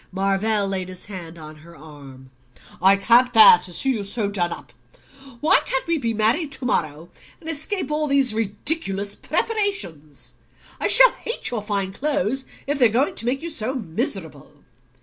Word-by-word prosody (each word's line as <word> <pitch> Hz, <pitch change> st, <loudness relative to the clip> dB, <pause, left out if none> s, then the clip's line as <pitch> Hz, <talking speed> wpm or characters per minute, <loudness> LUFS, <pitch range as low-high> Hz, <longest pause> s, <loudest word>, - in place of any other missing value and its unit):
Marvell 195 Hz, +2 st, 0 dB
laid 190 Hz, -1 st, -4 dB
his 185 Hz, -1 st, -7 dB
hand 175 Hz, -5 st, -9 dB
on 155 Hz, -1 st, -12 dB
her 170 Hz, +2 st, -16 dB
arm, 140 Hz, -4 st, -14 dB, 0.5 s
"I 190 Hz, +2 st, +6 dB
can't 240 Hz, +5 st, +3 dB
bear 220 Hz, -6 st, +8 dB
to 180 Hz, 0 st, -4 dB
see 265 Hz, +10 st, 0 dB
you 220 Hz, -5 st, -3 dB
so 200 Hz, 0 st, -3 dB
done 175 Hz, -4 st, -1 dB
up. 120 Hz, -, -10 dB, 0.7 s
Why 305 Hz, -, +5 dB
can't -, -, -3 dB
we 335 Hz, -1 st, -1 dB
be 230 Hz, -4 st, -2 dB
married 230 Hz, +8 st, 0 dB
to 260 Hz, -, -8 dB
morrow, 155 Hz, -6 st, -2 dB, 0.3 s
and 320 Hz, -, -14 dB
escape 325 Hz, +3 st, -3 dB
all 300 Hz, 0 st, -1 dB
these 275 Hz, -4 st, +2 dB
ridiculous 205 Hz, -1 st, -1 dB
preparations? 395 Hz, -, -3 dB, 0.5 s
I -, -, 0 dB
shall -, -, +8 dB
hate 460 Hz, -, -4 dB
your 230 Hz, -3 st, -3 dB
fine 200 Hz, -2 st, -3 dB
clothes 270 Hz, 0 st, -2 dB, 0.2 s
if 285 Hz, 0 st, -3 dB
they're 245 Hz, -3 st, +5 dB
going 245 Hz, +6 st, 0 dB
to 230 Hz, -, -5 dB
make 270 Hz, +4 st, -2 dB
you 335 Hz, -, -5 dB
so 255 Hz, -2 st, -3 dB
miserable." 165 Hz, -, -6 dB
215 Hz, 170 wpm, -21 LUFS, 180-275 Hz, 0.7 s, bear